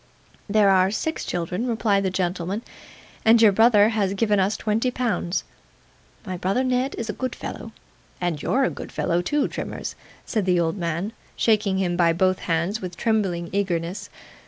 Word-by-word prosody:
'There 205 -1 +4
are 185 0 +4
six 315 +10 -2
children,' 180 +7 -2
replied 220 -4 +1
the 190 - 0
gentleman, 185 +3 -2 0.6
'and 225 +1 +6
your 220 -2 +7
brother 215 0 +5
has 200 -3 0
given 210 -1 +2
us 195 +3 +1
twenty 220 +4 0
pounds.' 235 -8 -1 0.8
'My 185 -2 -4
brother 195 +8 0
Ned 255 +1 0
is 230 - -3
a 210 - -2
good 255 +4 -4
fellow, - - -7 0.5
and 175 -5 -2
you're 270 +10 +1
a - - +1
good - - -8
fellow 170 +1 0
too, 290 +10 0
Trimmers,' - - -5 0.3
said 215 -4 -1
the 180 -1 +3
old 165 -1 0
man, 175 +3 -3 0.2
shaking 210 -4 +2
him 180 -2 0
by 170 -1 +3
both 185 +2 +2
hands 170 +6 -1
with 180 -2 -6
trembling 195 -7 0
eagerness. 190 0 -2
200 Hz, 170 wpm, -24 LUFS, 180-220 Hz, 0.8 s, your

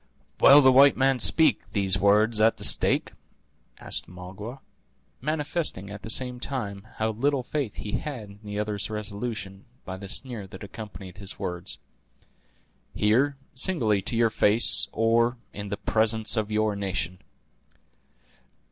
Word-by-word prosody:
"Will 145 +1 +8
the 130 - +7
white 135 +2 +6
man 135 0 +2
speak 160 +7 +4
these 95 -2 +2
words 105 +2 +3
at 110 +1 +4
the - - -9
stake?" - - +2 0.7
asked - - -3
Magua; 95 +8 -9 0.6
manifesting, 150 - -2
at 105 0 -8
the - - -8
same 125 +1 -1
time, 110 -7 -4
how 110 0 -1
little 135 +4 0
faith 135 -4 -3
he 105 - -6
had 130 -8 -6
in 100 0 -15
the 105 0 -6
other's 105 -2 -1
resolution 105 -2 -4 0.2
by 95 0 -6
the 100 0 -9
sneer 110 -1 -2
that 95 +1 -11
accompanied 100 -3 -10
his 100 -1 -6
words. 90 +2 -5 1.2
"Here; 125 +7 +2 0.2
singly 125 - +2
to 115 - -2
your 115 -1 +3
face, 110 +2 +3
or 115 +2 +2 0.2
in 100 0 -6
the 100 - -3
presence 110 0 0
of 110 -1 -1
your 105 -1 +1
nation." 95 -2 -3
110 Hz, 145 wpm, -26 LUFS, 100-125 Hz, 1.2 s, Will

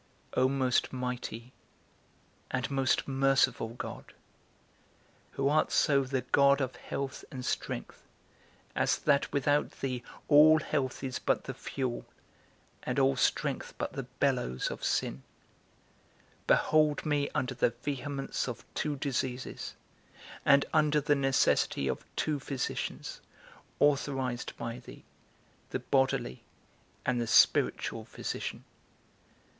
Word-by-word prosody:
O 130 +1 +3
most 130 -2 +1
mighty 125 -1 -5 1.0
and 130 +1 -2
most 135 -2 +1
merciful 135 -3 +2
God, - - -7 1.2
who 135 - 0
art 150 +2 +2
so 140 -2 +4
the 130 0 -1
God 140 +2 +4
of 130 -2 -2
health 140 -1 -5
and 130 -1 -6
strength, - - -3 0.7
as - - +2
that 145 -1 +2
without 145 +1 +2
thee 130 -2 -2 0.3
all 155 +1 +8
health 140 -3 -2
is 130 -2 -3
but - - +1
the - - -5
fuel, 130 -3 -4 0.7
and - - -3
all 70 0 +4
strength - - 0
but - - -3
the - - -3 0.2
bellows 125 - 0
of - - -7
sin; 65 - 0 1.3
behold 155 -1 +3
me 145 -2 +1
under 125 +1 0
the 125 - +2
vehemence 140 +1 -3
of 125 - -6
two 150 -1 -1
diseases, 130 -2 -3 0.7
and 140 0 +5
under 150 0 +4
the 145 +1 +2
necessity 135 - +2
of 65 - -2
two 150 -2 0
physicians, 135 -1 -4 0.6
authorized 135 -4 0
by 115 +1 -5
thee, 120 - -13 0.7
the - - -1
bodily, 130 - 0 0.6
and 125 -1 +1
the 115 - -2
spiritual - - +3
physician. - - -5
135 Hz, 120 wpm, -30 LUFS, 125-140 Hz, 1.3 s, all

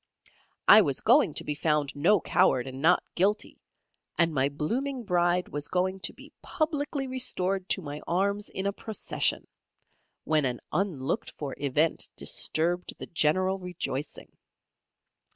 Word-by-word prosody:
I - - +10
was - - 0
going - - +4
to - - -3
be 150 - -2
found 150 -1 0
"No 180 +8 +4
Coward 125 -5 +2
and 130 0 -7
Not 175 +4 +4
Guilty," 205 +4 0 0.6
and 170 -1 +2
my 135 -1 +1
blooming 245 - -3
Bride 180 -2 +1
was 145 0 -3
going 185 +1 -1
to - - -2
be - - -16
publicly 295 -3 -2
restored 195 -7 0
to 190 - 0
my 145 0 -6
arms 200 +3 0
in 190 - -3
a 200 - 0
procession, 220 +1 -1 0.8
when 155 -1 +2
an 125 -2 -1
unlooked 170 -9 -2
for 140 -3 -5
event 145 +3 +1
disturbed 175 +3 -1
the - - -7
general 185 +4 +1
rejoicing. 175 -6 -6
180 Hz, 140 wpm, -28 LUFS, 150-200 Hz, 0.8 s, I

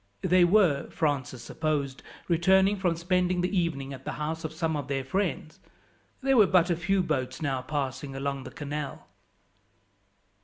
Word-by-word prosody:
They 180 0 +5
were, 175 -6 +3
Francis 140 -5 -2
supposed, 145 -4 -2 0.3
returning 190 +4 +4
from 185 -4 0
spending 180 +1 +1
the 180 +3 -1
evening 145 -6 -1
at 135 0 -10
the - - -4
house 160 +2 -4
of 160 - -3
some 160 0 -1
of 145 -3 -4
their 135 -1 -1
friends. 170 +1 -2 0.6
There 270 -1 +3
were 210 -3 +7
but 180 -1 +3
few 190 +2 +1
boats 130 -6 -2
now 135 -4 -1
passing 135 0 -4
along 140 0 -3
the - - -6
canal. 145 -1 -5
160 Hz, 155 wpm, -28 LUFS, 140-180 Hz, 0.6 s, were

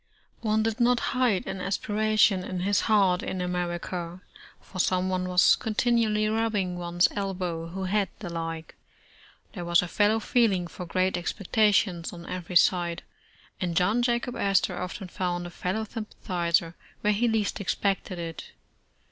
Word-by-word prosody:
' - - -43
One 220 -1 +1
did 225 +1 -1
not 245 0 +4
hide 250 -7 +2
an 190 -1 -5
aspiration 210 0 +2
in 185 -1 -4
his 200 +2 +2
heart 195 -4 +4
in 185 - -4
America, 180 0 -3 0.4
for 185 - -10
someone 185 0 +1
was 180 0 +5
continually 220 -1 +1
rubbing 215 -4 0
one's 175 0 +2
elbow, 180 -4 -3
who 190 +3 -5
had 200 +1 +1
the 175 -5 -7
like. 165 -1 -5 0.8
There 180 - -5
was 170 +1 +3
a - - -4
fellow 210 +5 +2
feeling 215 -6 +2
for 175 +1 -8
great 185 +1 +1
expectations 195 -1 +1
on 170 -1 -10
every 180 0 -6
side, 175 -1 +3 0.6
and 175 -2 -1
John 210 +7 +3
Jacob 240 0 0
As 195 -2 +3
tor 180 -1 -3
often 185 +1 -5
found 175 -1 -3
a 175 - -7
fellow 185 +5 -2
sympathizer 175 -6 -1 0.3
where 210 0 +2
he 235 +4 +1
least 220 -3 0
expected 195 -1 -1
it. 165 -2 -7
185 Hz, 155 wpm, -27 LUFS, 175-215 Hz, 0.8 s, was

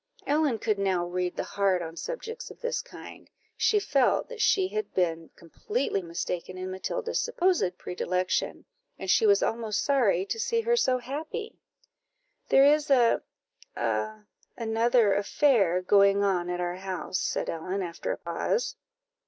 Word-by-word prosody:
Ellen 290 -4 +2
could 215 -2 -1
now 190 -3 +1
read 180 0 -2
the - - -2
heart 195 -3 0
on 165 0 -7
subjects 485 - -6
of - - -13
this 485 0 -2
kind; - - -12 0.3
she 425 - +3
felt 275 -10 +1
that 480 -3 -6
she 380 -3 +3
had 430 +1 -3
been 165 -3 0
completely 195 - -3
mistaken 170 +1 -4
in 185 0 -5
Matilda's 465 - -2
supposed 355 - +1
predilection, 180 +1 -2 0.3
and - - -1
she 445 - +4
was 405 -1 +4
almost 225 -2 -1
sorry 230 -10 +2
to 225 +3 -4
see 460 - +1
her 470 +1 +2
so 260 - +2
happy. 310 - -6 0.9
"There 270 - +6
is 295 +1 +3
a 245 -4 +4 0.5
a 215 -1 -2 0.3
another 230 -1 +2
affair 200 - +2
going 200 +1 +4
on 180 -3 0
at 180 0 -2
our 175 0 -2
house," 190 0 -3
said - - -2
Ellen, 185 +4 -3
after 170 -2 -4
a - - -3
pause. - - -2
215 Hz, 155 wpm, -27 LUFS, -, 0.9 s, There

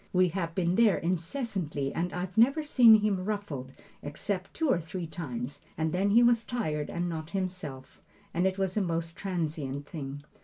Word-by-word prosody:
We 185 -1 +4
have 170 -2 -3
been 180 -1 +1
there 225 -4 +5
incessantly 170 - -2
and 175 +2 -1
I've 180 +1 -4
never 275 +8 +4
seen 235 -7 +7
him 200 -3 +1
ruffled 185 -11 -4 0.3
except 185 +6 -4
two 320 - 0
or 260 - +3
three 170 +2 -5
times, 145 -4 -5 0.2
and 160 0 0
then 195 +3 +2
he 230 +4 +6
was 235 -1 +4
tired 155 - -2
and 175 +1 -2
not 160 -2 -4
himself, 180 -8 -5 0.3
and 175 +2 +2
it 190 0 -1
was 190 -1 -1
a 215 - +2
most 165 -2 -2
transient 155 -7 -3
thing. 145 -2 -6
180 Hz, 180 wpm, -29 LUFS, 155-200 Hz, 0.3 s, seen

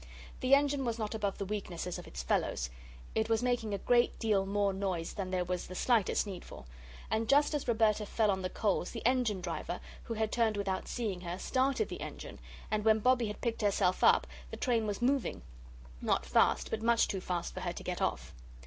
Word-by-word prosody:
The 255 +2 +5
engine 285 -1 +1
was 235 -2 -1
not 215 -1 -3
above 205 -3 -2
the 200 - -3
weaknesses 180 -4 -4
of - - -10
its 65 +1 -6
fellows; - - 0 0.4
it 220 0 0
was 225 +1 +2
making 245 -3 0
a 200 - 0
great 240 +4 +2
deal 205 -4 +1
more 200 0 +1
noise 190 -4 -2
than 195 -3 -4
there 185 -1 0
was 180 0 -3
the 185 - -8
slightest 230 -1 +2
need 190 -3 -6
for. - - -11 0.5
And 220 +1 0
just 290 +2 +4
as 295 - -2
Roberta 220 -2 +2
fell 215 -1 +2
on 190 -1 -1
the 185 - -2
coals, 200 -4 0
the 230 - -7
engine 240 -6 +2
driver, 175 0 -4 0.3
who 230 - -4
had 220 0 -1
turned 225 -3 +2
without 195 -2 -2
seeing 210 -7 -3
her, 175 0 -4
started 265 - +1
the - - -7
engine, - - -7 0.3
and 215 -1 0
when 220 0 +5
Bobbie 245 +1 +3
had 210 - -6
picked 235 -2 -1
herself 195 -3 +2
up, - - +6 0.2
the - - -7
train 230 -4 +1
was 205 +3 -3
moving 265 - +1 0.6
not - - +1
fast, - - +2
but 220 - -2
much 230 0 +3
too 190 - -3
fast 175 -2 -3
for - - -5
her - - -3
to - - -8
get - - -3
off. - - -1
215 Hz, 215 wpm, -32 LUFS, 190-235 Hz, 0.6 s, up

